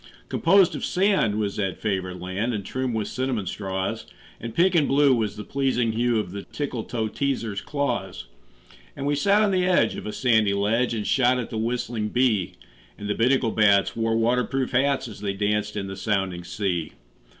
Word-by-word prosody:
Composed 195 -3 +4
of - - -5
sand 185 - +2
was 105 -2 -2
that 95 -3 -2
favored 95 -3 -3
land, 100 +6 -2
And 100 -2 -5
trimmed 130 0 -2
with 110 -2 -1
cinnamon 130 -6 -2
straws; 95 0 -3 0.3
And 115 -1 -7
pink 180 +2 +4
and 160 -5 +3
blue 140 0 +4
was 110 -4 -1
the 105 - -7
pleasing 130 -2 0
hue 120 +1 +1
Of 95 -4 -4
the 100 +1 -5
Tickletoeteaser's 115 -3 -3
claws. 120 - -3 0.7
And 140 - -5
we 145 - +1
sat 200 +9 +3
on 205 - +2
the 185 -1 +2
edge 170 -12 +3
of - - -6
a - - -3
sandy 110 -4 +2
ledge 115 +5 +1
And 105 -2 -3
shot 125 -1 +3
at 125 - -4
the 110 - -3
whistling 120 -1 -2
bee; 115 -7 +1 0.4
And 105 - -6
the 105 - 0
Binnacle 125 0 +2
bats 100 -2 +3
wore 115 0 0
water 120 +2 +2
proof 130 +2 -2
hats 135 +1 +1
As 105 -3 -10
they 100 -1 -2
danced 105 +1 -1
in 100 - -2
the 95 0 -6
sounding 95 -3 -1
sea. 85 -2 -2
115 Hz, 190 wpm, -24 LUFS, 100-130 Hz, 0.7 s, Composed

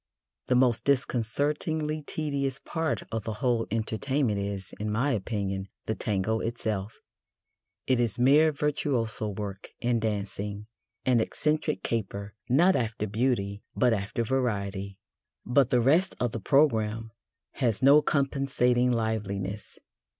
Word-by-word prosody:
The 125 - +3
most 125 -2 +3
disconcertingly 145 +4 0
tedious 140 -3 -2
part 160 +1 -2
of 110 -1 -2
the 110 - -3
whole 120 0 0
entertainment 115 +2 0
is, 100 -1 -4
in 105 +1 -2
my 125 +7 +1
opinion, 100 -3 -2 0.2
the 110 - -1
Tango 110 +1 -1
itself: 110 -3 -3 0.9
it 130 -2 +2
is 120 -4 0
mere 145 +6 +5
virtuoso 135 -7 -1
work 100 -1 -6
in 120 -1 +1
dancing 105 -1 -3 0.4
an 125 -2 +4
eccentric 150 +6 -1
caper, 100 -2 -3 0.2
not 175 +9 +5
after 110 -2 -1
beauty, 105 -2 -1
but 125 -2 +3
after 105 +3 -2
variety. 100 -6 -2 0.5
But 130 +1 +3
the 125 -2 +3
rest 165 +10 +3
of 120 -2 0
the 115 - -4
programme 115 -4 +2 0.5
has 120 -3 +1
no 140 +3 +8
compensating 135 -4 +1
liveliness. 105 -3 -2
115 Hz, 125 wpm, -28 LUFS, 105-135 Hz, 0.9 s, no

